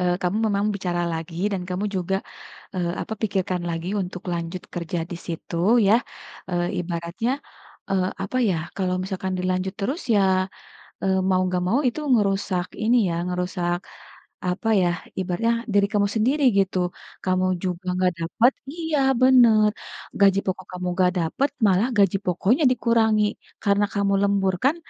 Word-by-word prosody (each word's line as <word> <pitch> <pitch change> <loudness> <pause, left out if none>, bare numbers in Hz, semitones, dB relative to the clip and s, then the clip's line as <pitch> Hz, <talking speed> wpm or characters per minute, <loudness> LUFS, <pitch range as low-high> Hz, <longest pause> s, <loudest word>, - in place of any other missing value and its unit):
eee, 180 -1 +2
kamu 180 +3 0
memang 200 -1 0
bicara 175 -3 -2
lagi 170 +4 -3
dan 190 -2 -2
kamu 185 +2 -2
juga, 185 +1 0 0.6
eee, 175 -2 -1
apa, - - -7
pikirkan 190 -4 -1
lagi 165 +1 -3
untuk 180 0 -7
lanjut 170 +1 -4
kerja 170 0 -3
disitu, 170 -1 -6 0.3
ya. 205 - +6 0.6
Eee, 175 0 0
ibaratnya, 170 +7 -2 0.6
eee, 185 -1 +1 0.2
apa 255 +6 -2
ya, 205 -8 +2 0.2
kalau 185 -2 0
misalkan 190 0 -3
dilanjut 185 +1 -1
terus 270 - -2
ya, 190 -2 +3 0.6
eee, 190 0 +2
mau 185 -1 +3
nggak 180 -1 -1
mau 230 +9 +2
itu 250 - -1
ngerusak 195 -5 +1 0.2
ini 235 +3 +4
ya, 170 - -1
ngerusak, 180 -1 -1 0.7
apa 180 +5 -1
ya, 175 - +3 0.3
ibaratnya 185 +5 0 0.2
diri 200 0 +4
kamu 205 -1 +3
sendiri, 260 +7 +2
gitu. 190 -1 +2 0.5
Kamu 185 0 +2 0.2
juga 180 0 -2
nggak 185 -1 +2
dapet 225 +10 +2 0.2
iya, 320 -3 -1 0.2
bener, 235 -5 +6 0.5
gaji 195 -1 +5
pokok 185 -1 -3
kamu 180 0 -4
nggak 180 -1 +4
dapet, 215 - 0 0.2
malah 195 +4 +3
gaji 195 -1 +4
pokoknya 195 - +2
dikurangi. 225 -3 +3 0.4
Karena 200 0 +3
kamu 200 -1 +1
lembur 200 -2 +2
kan, 285 +4 +4
190 Hz, 150 wpm, -24 LUFS, 180-210 Hz, 0.7 s, ya